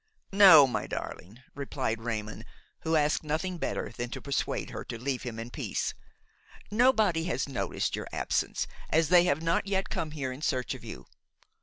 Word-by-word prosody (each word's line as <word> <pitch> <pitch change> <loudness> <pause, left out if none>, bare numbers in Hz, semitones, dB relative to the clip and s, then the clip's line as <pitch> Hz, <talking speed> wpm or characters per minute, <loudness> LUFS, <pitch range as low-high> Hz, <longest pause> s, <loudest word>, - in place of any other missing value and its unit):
"No, 190 -7 +9
my 130 - -2
darling," 110 +8 -7
replied 130 -5 -3
Raymon, 110 -2 -4 0.4
who 160 0 0
asked 150 0 +2
nothing 165 +4 -2
better - - -3
than 120 0 -4
to - - -5
persuade 140 -1 -2
her - - -5
to 115 - -6
leave 130 +2 -2
him 120 -3 -6
in 115 +2 -6
peace. - - -2 0.8
"Nobody 215 -8 +3
has 130 -6 -1
noticed 100 -9 -2
your - - -5
absence, - - -1 0.2
as 160 -1 +2
they 175 0 +6
have 155 -1 +1
not 165 +4 +1
yet 195 -1 -1
come 160 - -2
here 140 -4 -4
in 130 +3 -8
search 130 -5 -1
of - - -10
you. - - -9
145 Hz, 175 wpm, -29 LUFS, 120-165 Hz, 0.8 s, No